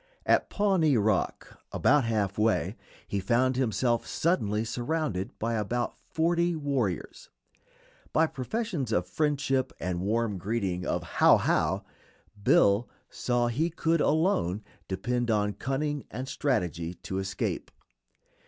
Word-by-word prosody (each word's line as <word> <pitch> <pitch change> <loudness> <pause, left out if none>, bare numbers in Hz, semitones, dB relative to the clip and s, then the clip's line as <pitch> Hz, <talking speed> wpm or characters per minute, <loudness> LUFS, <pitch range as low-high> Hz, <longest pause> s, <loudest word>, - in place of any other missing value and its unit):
At - - +3
Pawnee 185 - +3
Rock, 105 -2 -1
about 145 -2 +3
half 105 -4 0
way, 110 +1 +1 0.3
he 100 - -1
found 125 +6 +2
himself 120 -1 +1
suddenly 110 - 0
surrounded 120 - -2
by 115 +1 -1
about 115 +3 -1
forty 170 +1 0
warriors. 135 - -2 0.8
By 160 - +4
professions 160 - -3
of 90 -4 +1
friendship 135 +3 0
and 90 -1 -2
warm 105 0 0
greeting 95 -3 -2
of - - -1
"How, - - +5
how!" - - +1 0.6
Bill 100 +2 +4 0.2
saw 120 -1 0
he 135 +8 0
could 165 -1 +1
alone 145 - +1 0.2
depend 120 +6 -1
on 105 -2 +1
cunning 135 +6 -2
and 130 +4 -5
strategy 90 - -1
to 95 +2 -5
escape. 95 0 -3
120 Hz, 120 wpm, -28 LUFS, 100-145 Hz, 0.8 s, How